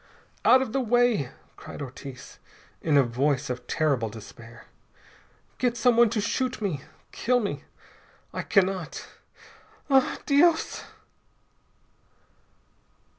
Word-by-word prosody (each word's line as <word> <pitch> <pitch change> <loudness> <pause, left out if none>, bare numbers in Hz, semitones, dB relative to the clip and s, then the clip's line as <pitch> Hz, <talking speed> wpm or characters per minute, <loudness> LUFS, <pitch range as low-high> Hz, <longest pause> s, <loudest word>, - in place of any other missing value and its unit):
"Out 260 +1 +6
of 235 - -7
the 270 - +1
way!" 240 - +2 0.3
cried - - -10
Ortiz 135 -1 -9 0.4
in 150 -3 +3
a 140 - +6
voice 135 +3 0
of 125 - -6
terrible 140 -8 +1
despair. 115 +1 -12 0.9
"Get 245 -1 +1
someone 235 0 +5
to 220 - -1
shoot 250 +4 -1
me! 185 -10 -2 0.3
Kill 250 +2 +1
me! 205 -4 -4 0.7
I - - -2
cannot 190 -4 0 0.8
ah, 265 -1 +4
_Dios! 320 +3 +3
195 Hz, 105 wpm, -26 LUFS, -, 0.9 s, Out